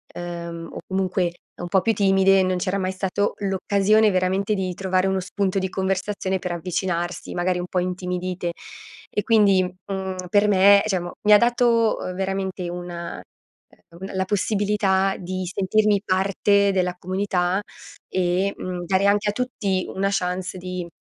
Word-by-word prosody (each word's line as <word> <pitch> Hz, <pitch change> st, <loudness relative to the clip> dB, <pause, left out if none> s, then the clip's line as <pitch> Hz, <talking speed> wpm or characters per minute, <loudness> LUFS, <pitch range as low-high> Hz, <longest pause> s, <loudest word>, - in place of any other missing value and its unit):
ehm, 170 Hz, -1 st, -6 dB
o -, -, -8 dB
comunque 185 Hz, -2 st, 0 dB, 0.3 s
un 175 Hz, -, -4 dB
po' 190 Hz, 0 st, +3 dB
più 225 Hz, -, +2 dB
timide, 195 Hz, -1 st, +4 dB
non 185 Hz, 0 st, 0 dB
c'era 185 Hz, +2 st, -1 dB
mai 185 Hz, 0 st, -1 dB
stato 195 Hz, +2 st, -1 dB
l'occasione 200 Hz, +2 st, +2 dB
veramente 190 Hz, +3 st, +1 dB
di 185 Hz, -2 st, -2 dB
trovare 190 Hz, 0 st, 0 dB
uno 190 Hz, 0 st, 0 dB
spunto 190 Hz, +1 st, -1 dB
di 190 Hz, -, -1 dB
conversazione 190 Hz, 0 st, -1 dB
per 180 Hz, -1 st, -3 dB
avvicinarsi, 175 Hz, 0 st, -3 dB
magari 180 Hz, 0 st, 0 dB
un 175 Hz, -, -4 dB
po' 180 Hz, -, 0 dB
intimidite. 180 Hz, -1 st, -3 dB, 0.6 s
E 210 Hz, -, -1 dB
quindi, 205 Hz, -4 st, +4 dB
mhmm, 185 Hz, 0 st, -5 dB
per 205 Hz, +1 st, +4 dB
me 200 Hz, 0 st, +6 dB
diciamo 175 Hz, -3 st, -2 dB
mi 210 Hz, 0 st, +6 dB
ha -, -, +10 dB
dato, 235 Hz, -1 st, +3 dB
uhm, 185 Hz, -, -4 dB
veramente 190 Hz, -1 st, -3 dB
una 175 Hz, -1 st, -6 dB
ehm, 170 Hz, +1 st, -21 dB
un 190 Hz, -, -5 dB
la 190 Hz, 0 st, 0 dB
possibilità 200 Hz, -1 st, +1 dB
di 185 Hz, 0 st, -4 dB
sentirmi 205 Hz, +1 st, +2 dB
parte 200 Hz, +1 st, +2 dB
della 180 Hz, -1 st, 0 dB
comunità 185 Hz, 0 st, 0 dB, 0.5 s
e, 185 Hz, +2 st, 0 dB
mhmm, 180 Hz, -1 st, -5 dB
dare 190 Hz, +2 st, +2 dB
anche 205 Hz, +1 st, +2 dB
a -, -, -1 dB
tutti 205 Hz, -7 st, -1 dB
una 195 Hz, +1 st, 0 dB
chance 185 Hz, 0 st, -2 dB
di 180 Hz, -1 st, -5 dB
190 Hz, 155 wpm, -23 LUFS, 180-200 Hz, 0.6 s, ha